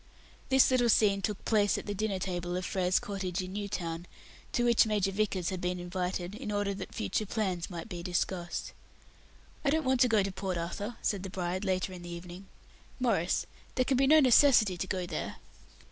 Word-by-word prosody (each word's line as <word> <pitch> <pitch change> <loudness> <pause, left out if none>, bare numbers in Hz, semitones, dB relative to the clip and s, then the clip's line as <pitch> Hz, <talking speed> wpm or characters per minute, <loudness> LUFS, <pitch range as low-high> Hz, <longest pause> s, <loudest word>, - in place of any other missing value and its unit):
This 265 0 +5
little 245 -2 +3
scene 200 -2 +4
took 205 0 -3
place 205 -2 +3
at - - -6
the 205 - -3
dinner 205 -1 -1
table 175 -1 -3
of 185 - -3
Frere's 185 -1 +1
cottage, 190 -2 -3
in 185 +1 -7
New 205 0 -3
Town, 170 -3 -4 0.4
to 240 - +1
which 235 -2 +5
Major 205 -2 +1
Vickers 195 -3 0
had 185 -2 -4
been 180 0 -1
invited, 180 +1 -3
in 220 -1 -5
order 205 -1 0
that 190 -1 -7
future 215 -1 -1
plans 185 -5 -2
might 170 0 -6
be 180 -5 -6
discussed. 175 0 -2 0.9
"I 280 - +2
don't 315 +1 +1
want 260 -1 +2
to 250 - +6
go 220 -4 +3
to 195 - -2
Port 190 -1 -3
Arthur," 200 +7 -4
said 200 -3 0
the 190 - -6
bride, 185 +1 -3
later 185 -1 -1
in 180 - -8
the 175 - -8
evening. 175 +2 -8 0.5
"Maurice, 200 -9 +1 0.3
there 255 - +2
can 270 - +2
be 270 +1 +4
no 310 +2 +7
necessity 250 -7 +6
to 190 - -4
go 185 -1 -2
there." - - -4
195 Hz, 205 wpm, -30 LUFS, 180-215 Hz, 0.9 s, no